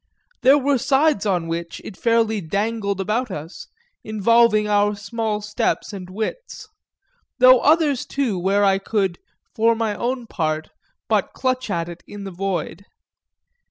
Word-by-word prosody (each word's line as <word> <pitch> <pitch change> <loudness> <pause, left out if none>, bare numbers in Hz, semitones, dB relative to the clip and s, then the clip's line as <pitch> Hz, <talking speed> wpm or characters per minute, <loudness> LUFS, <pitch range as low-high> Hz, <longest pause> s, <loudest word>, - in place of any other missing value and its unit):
There 270 +3 +6
were 280 -1 +1
sides 270 -5 +2
on 180 -4 0
which 170 0 -4
it 205 - -8
fairly 225 -2 +1
dangled 200 +3 -2
about 220 +6 -1
us, 165 -1 -8 0.4
involving 215 0 +3
our 205 0 +2
small 210 +1 -3
steps 210 +1 -2
and 185 -2 -8
wits; 225 - -5 0.7
though 255 0 +7
others 300 -3 +3
too 250 -9 -1
where 195 +3 +2
I 195 -1 +3
could, 195 -3 -1 0.3
for 230 +1 +3
my 225 -2 -1
own 245 +3 -3
part, 155 -7 -2 0.4
but - - 0
clutch 255 -2 -1
at 170 -3 -1
it 175 0 -9
in 205 -1 -9
the 195 - -6
void. 185 0 -4
210 Hz, 145 wpm, -21 LUFS, 195-235 Hz, 0.7 s, though